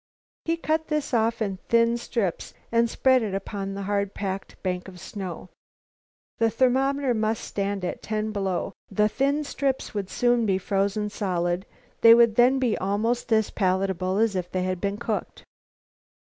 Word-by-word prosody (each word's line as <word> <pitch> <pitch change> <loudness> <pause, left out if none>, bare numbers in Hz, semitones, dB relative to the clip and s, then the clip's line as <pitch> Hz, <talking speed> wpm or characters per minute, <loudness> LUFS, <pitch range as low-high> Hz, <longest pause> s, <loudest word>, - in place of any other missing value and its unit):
He 330 0 0
cut 315 -1 -1
this 300 -3 -2
off 230 0 +2
in 195 -3 -3
thin 230 0 +4
strips 230 -6 -3 0.2
and 230 0 +3
spread 260 +2 +3
it 205 -4 -2
upon 195 0 -4
a 200 - -4
hard 200 0 -1
packed 195 -1 -4
bank 180 -1 -2
of 180 -1 -11
snow. 185 -2 -7 0.9
The 225 0 +4
thermometer 265 +3 +2
must 220 -1 -1
stand 200 -1 -2
at - - -4
ten 215 0 -2
below. 195 -2 -2 0.2
The 210 +1 +2
thin 280 +6 0
strips 275 -2 -2
would 200 -3 -3
soon 240 -2 +2
be 190 -2 +2
frozen 200 +2 -1
solid. 180 -2 -1 0.3
They 230 0 +9
would 235 -2 +5
then 245 +4 +5
be 250 -5 +1
almost 225 +5 -1
as 220 -1 +3
palatable 190 -1 0
as 220 -2 +2
if 180 -1 -2
they 185 -1 -1
had 185 -1 -2
been 200 0 -1
cooked. 235 - -4
210 Hz, 165 wpm, -25 LUFS, 195-235 Hz, 0.9 s, They